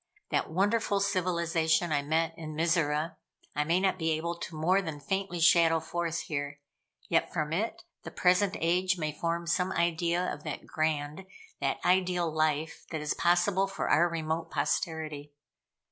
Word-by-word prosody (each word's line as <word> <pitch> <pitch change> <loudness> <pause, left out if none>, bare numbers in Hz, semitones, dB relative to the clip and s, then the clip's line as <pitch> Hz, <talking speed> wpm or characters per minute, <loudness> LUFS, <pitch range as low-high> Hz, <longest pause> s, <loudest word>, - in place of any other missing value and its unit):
That - - 0
wonderful 200 +4 +1
civilization 170 -4 +1
I 145 -1 +2
met 160 +3 0
with 165 0 -12
in 155 0 -6
Mizora, 160 -1 +1 0.4
I 150 - +2
may 165 +4 +2
not 190 -1 +1
be 165 0 0
able 165 +2 -2
to 170 -1 -7
more 180 +5 +2
than 160 -5 -5
faintly 190 +4 -2
shadow 165 -1 +5
forth 170 0 -2
here, 145 -1 -4 0.5
yet - - +1
from 155 0 -2
it, 225 - -2 0.2
the - - -7
present 185 +2 +2
age 180 +3 +2
may 155 -2 -2
form 170 +3 -2
some 180 +2 +1
idea 170 0 +1
of 150 - -9
that - - -5
grand, 155 +3 -2 0.3
that - - 0
ideal 180 -2 +2
life 155 0 0
that 160 - -3
is 150 - -1
possible 180 +3 +2
for 195 - -3
our 175 +2 +5
remote 165 0 -2
posterity. 155 -4 -2
170 Hz, 160 wpm, -29 LUFS, 155-180 Hz, 0.5 s, shadow